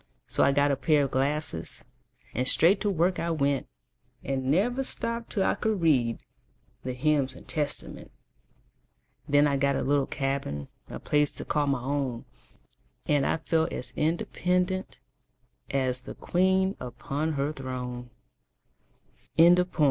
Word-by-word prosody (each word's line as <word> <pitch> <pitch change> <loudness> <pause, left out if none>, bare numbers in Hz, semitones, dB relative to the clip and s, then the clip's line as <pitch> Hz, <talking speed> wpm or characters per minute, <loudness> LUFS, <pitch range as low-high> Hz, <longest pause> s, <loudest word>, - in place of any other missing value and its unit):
So - - +1
I 140 - +5
got 140 +1 +3
a - - +2
pair 145 +2 +2
of 135 - -2
glasses, 135 - -2 0.5
And 125 +2 0
straight 185 +8 +7
to 210 - +1
work 180 0 +1
I 170 - -1
went, 140 -4 0 0.6
And 130 -1 -2
never 230 - +2
stopped 230 -3 -3
till 195 - 0
I - - +2
could 215 -2 -1
read 130 -9 +2 0.7
The 130 - -3
hymns 135 0 +1
and - - -14
Testament. 145 -2 -4 1.2
Then 145 +1 +5
I 140 -1 +2
got 140 0 +1
a - - -1
little 140 0 +1
cabin 135 - -3 0.2
A - - -6
place 150 -1 +2
to - - -6
call 150 -1 0
my 135 -3 0
own 135 -3 -2 0.8
And 145 -2 +2
I - - +1
felt 160 0 0
as 125 0 -6
independent 180 +3 -1 0.7
As 130 -2 0
the - - -9
queen 190 +2 +1
upon 135 +6 -3
her 140 +1 -1
throne. 125 -2 -6 1.3
Frances 175 +2 +6
E. 180 - -15
145 Hz, 150 wpm, -27 LUFS, 130-170 Hz, 1.3 s, straight